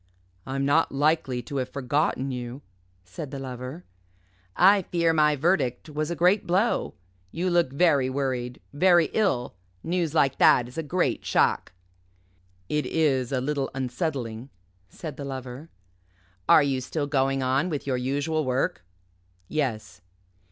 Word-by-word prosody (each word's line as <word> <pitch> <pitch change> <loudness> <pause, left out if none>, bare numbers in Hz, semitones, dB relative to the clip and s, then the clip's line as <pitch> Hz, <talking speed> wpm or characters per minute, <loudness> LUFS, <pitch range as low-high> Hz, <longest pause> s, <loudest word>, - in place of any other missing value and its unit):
"I'm 135 +1 -1
not 150 +4 +3
likely 140 -3 +1
to 140 - -5
have 130 -1 -2
forgotten 140 0 -1
you," 125 +2 -6 0.4
said 100 - -8
the 140 - -6
Lover. 130 +4 -7 0.7
"I 195 +2 +6
fear 170 -2 +1
my 150 -1 +3
verdict 145 -3 0
was 150 0 -3
a 170 - -2
great 180 +5 +2
blow. 190 +7 +1 0.4
You 180 +3 -1
look 170 -6 +2
very 140 -3 +3
worried, 130 -2 -3
very 175 +2 +4
ill. 190 - 0 0.3
News 170 -2 -1
like 135 -4 +2
that 120 - +5
is 125 - -13
a - - +1
great 175 +4 -1
shock." - - +1 0.9
"It 150 +6 -1
is 135 -6 +1
a 130 -2 0
little 140 0 -1
unsettling," 130 -3 -3 0.4
said 150 - -8
the 145 - -6
Lover. 130 +2 -7 0.8
"Are 155 - +7
you 135 -2 0
still 145 +3 -3
going 135 -1 0
on 135 +7 +1
with 150 -4 -4
your 130 -2 0
usual 145 +5 -1
work?" 130 -7 -1 0.7
"Yes." 115 - -3
140 Hz, 145 wpm, -26 LUFS, 130-160 Hz, 0.9 s, Are